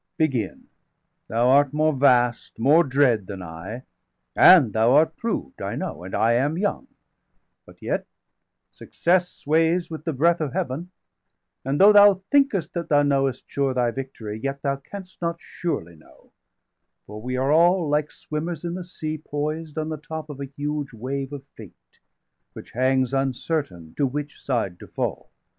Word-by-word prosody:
Begin! 130 -11 -1 0.6
thou 120 +3 +2
art 140 +1 +4
more 155 +1 +2
vast, 125 -3 +2
more 145 +9 +5
dread 125 - +2
than 95 -3 -7
I, 90 +9 -8 0.5
385 180 -4 +8
And 105 - -9
thou 115 +3 +3
art 160 +2 +4
proved, 225 - -4
I - - -3
know, 85 - -5
and 95 - -6
I 115 +1 +3
am 140 +7 +1
young 205 +7 -2 0.8
But - - -17
yet - - -2 0.6
success 175 +1 0
sways 165 +3 0
with 155 -2 -6
the 160 - -1
breath 165 +4 +2
of 145 -5 -2
Heaven. 150 +8 -3 0.7
And 135 +2 -1
though 205 +2 +8
thou 205 -1 +8 0.2
thinkest 275 - +2
that 170 -1 -4
thou 145 -1 +4
knowest 135 -2 +1
sure 135 -2 -1
Thy 120 -2 +1
victory, 115 -5 -6
yet 135 +1 -4
thou 140 -1 0
canst 190 +7 -11
not 170 -1 -1
surely 85 - -5
know. 80 - -22 0.7
For 105 +1 -9
we 125 +2 -3
are 135 +2 +1
all, 170 +2 +4
like 150 0 0
swimmers 155 +1 -5
in 170 0 -3
the 180 0 -5
sea, 155 -3 -5
390 155 - -25
Poised 155 +1 -3
on 155 0 -2
the 155 - -4
top 160 0 -7
of 140 - -10
a - - -3
huge 145 -2 -3
wave 135 +4 -4
of 140 -2 -8
fate, - - -12 0.8
Which - - -11
hangs 130 +1 +1
uncertain 135 - -2
to 140 - +2
which 145 +3 -6
side 110 -9 -2
to - - -11
fall. - - -4
145 Hz, 170 wpm, -24 LUFS, 125-160 Hz, 0.8 s, 385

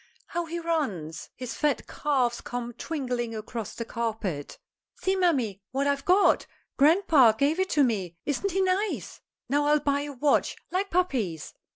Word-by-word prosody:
How 345 0 -3
he 335 +1 -4
runs! 245 - -2
His 250 -2 -5
fat 295 -3 0
calves 255 -5 0
come 240 -1 -5
twinkling 245 -5 -3
across 220 0 -5
the 230 - -4
carpet. 215 -11 -3 0.4
"See, 380 0 0
mammy, 265 - +1
what 270 +2 -1
I've 280 -1 0
got. 370 +3 +4 0.3
Grandpa 295 - +5
gave 285 +9 +1
it 375 0 +1
to 290 - +4
me. 190 -9 -1
Isn't 295 +7 0
he 385 +2 +1
nice? 380 +3 -1 0.3
Now 290 +3 +2
I'll 300 0 +4
buy 285 -1 +1
a 290 0 -5
watch 280 +2 +2 0.2
like 385 +2 0
pappy's." 250 - -1
280 Hz, 160 wpm, -27 LUFS, 230-330 Hz, 0.4 s, Grandpa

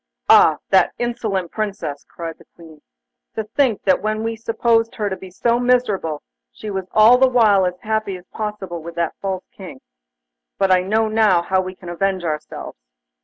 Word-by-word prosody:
'Ah! - - +6
that - - +4
insolent 220 -7 -2
Princess!' 200 -9 -4
cried 165 -1 -7
the - - -18
Queen. 160 -3 -15 0.5
'To 220 - -2
think 225 +1 0
that 190 -2 +2
when 215 +1 -2
we 225 0 -2
supposed 230 0 0
her 210 -3 -2
to - - -1
be 190 0 -11
so 235 +6 0
miserable, 215 -11 0 0.3
she 215 - -8
was 190 -2 -4
all 225 +4 +6
the 265 0 +5
while 210 -6 +4
as 180 0 -5
happy 215 -3 -2
as 180 - -16
possible 205 -5 -5
with 170 +1 -9
that 170 -2 -1
false 190 -2 -3
King. 185 -9 -11 0.8
But 195 -1 +2
I 185 -1 +5
know 215 +3 0 0.3
how 190 +1 +1
we 185 0 -7
can 185 - -13
avenge 185 +1 -1
ourselves! 155 - -5
195 Hz, 175 wpm, -20 LUFS, 180-220 Hz, 0.8 s, Ah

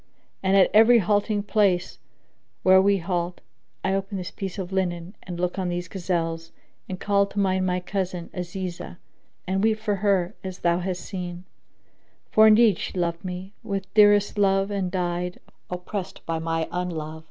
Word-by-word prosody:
and 195 +1 +3
at 190 - +5
every 225 +3 +7
halting 205 0 +1
place 195 -4 +1 0.6
where 190 0 +7
we 200 +1 +3
halt, 175 -1 -2 0.5
I 190 - +1
open 195 +1 -2
this 180 -1 -5
piece 195 -1 -6
of 190 -1 -5
linen 180 0 -2
and 175 -1 -7
look 180 +2 -1
on 185 -1 -1
these 175 +1 -3
gazelles 165 -3 -3 0.4
and 185 -1 -5
call 200 -1 +2
to 205 - -5
mind 190 -1 +1
my 180 0 0
cousin 180 -2 -4
Azizah 180 -1 -5 0.5
and 190 +2 0
weep 220 -1 +3
for 210 -2 -1
her 195 -3 +1
as 185 -1 -6
thou 170 0 +2
hast 180 -1 -3
seen; 180 -2 -6 0.9
for 220 0 +7
indeed 215 -3 +5
she - - -5
loved 170 -1 -1
me 185 +1 -6
with 195 -4 -4
dearest 205 -1 +5
love 195 0 +2
and 195 -3 -1
died, 180 0 -2 0.3
oppressed 180 +2 -5
by 165 -1 -2
my 165 0 -1
unlove. 160 -3 -4
185 Hz, 165 wpm, -25 LUFS, 175-200 Hz, 0.9 s, every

